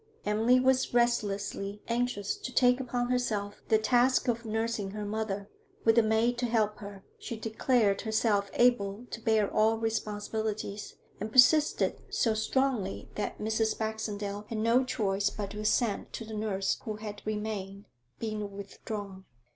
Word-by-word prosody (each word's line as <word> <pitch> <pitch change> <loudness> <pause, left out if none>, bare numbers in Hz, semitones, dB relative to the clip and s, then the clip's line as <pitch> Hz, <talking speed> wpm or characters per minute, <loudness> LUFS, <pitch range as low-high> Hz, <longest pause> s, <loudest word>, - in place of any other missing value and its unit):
Emily 225 +4 +4
was 260 -1 +2
restlessly 205 -3 0
anxious 235 -4 -1
to 255 - -7
take 250 +1 +4
upon 245 -1 -2
herself 210 -5 -1
the 220 - +5
task 245 +4 +3
of 235 -1 0
nursing 220 -2 -1
her 210 +1 -5
mother; 205 -1 -3 0.4
with 225 - +6
the 235 - +6
maid 220 +2 +2
to 245 - 0
help 215 -2 +1
her, 200 -2 -9 0.2
she 230 - -6
declared 220 -2 +1
herself 220 -2 +1
able 235 -2 +2
to 230 - -6
bear 220 -2 +3
all 220 +1 +3
responsibilities, 215 -1 -3 0.2
and 215 +2 -4
persisted 295 +5 +4
so 225 - +1
strongly 220 -2 -1
that 210 - -3
Mrs. 220 0 0
Baxendale 210 -2 -3
had 225 - -3
no 230 +4 +3
choice 205 -5 0
but 205 -1 -5
to 210 - -7
assent 215 0 0
to 225 - -5
the 220 - -8
nurse 210 -3 -1
who 215 - -4
had 210 -1 -7
remained 210 -2 -4 0.3
being 215 -2 -3
withdrawn. 200 -1 -7
220 Hz, 150 wpm, -30 LUFS, 205-235 Hz, 0.4 s, with